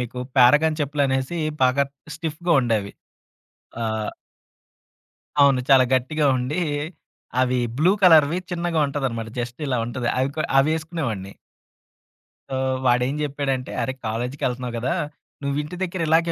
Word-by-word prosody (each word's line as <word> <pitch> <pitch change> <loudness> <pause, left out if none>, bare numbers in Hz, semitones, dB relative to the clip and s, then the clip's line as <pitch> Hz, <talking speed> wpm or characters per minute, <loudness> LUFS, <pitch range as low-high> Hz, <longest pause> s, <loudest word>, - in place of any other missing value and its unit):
మీకు 125 +1 -5 0.2
'పారగాన్' 150 +5 +5
చెప్పులు 145 0 0
అనేసి 130 +5 -1 0.2
బాగా 130 +2 +4 0.3
స్టిఫ్‌గా 165 +3 -2
ఉండేవి. 110 -5 -1 0.9
ఆహ్, 110 -1 -2 1.3
అవును. 135 -2 +5
చాలా 130 -1 +7
గట్టిగా 145 +4 +1
ఉండి. 140 +8 -2 0.8
అవి 125 0 +1 0.2
బ్లూ 175 +5 +5
కలర్‌వి 160 -2 +6
చిన్నగా 170 -2 0
ఉంటదనమాట. 130 -6 -3
జస్ట్ 120 +2 -5
ఇలా 125 -2 0
ఉంటది. 120 0 -3
అవి 130 +1 +2
కొ 155 - 0 0.2
అవి 135 - +4
వేసుకునేవాడిని. 140 - -4 1.2
సో, 135 - -3 0.3
వాాడేం 125 +2 +2
జెప్పాడంటే, 135 -3 -2
"అరే 130 - -2
కాలేజీకెళ్తున్నావు 125 +1 -3
కదా! 125 +3 0 0.5
నువ్వు 140 0 -1
ఇంటి 150 +4 -8
దగ్గర 185 0 -3
ఇలాగే 165 +2 +3
135 Hz, 125 wpm, -23 LUFS, 125-155 Hz, 1.3 s, చాలా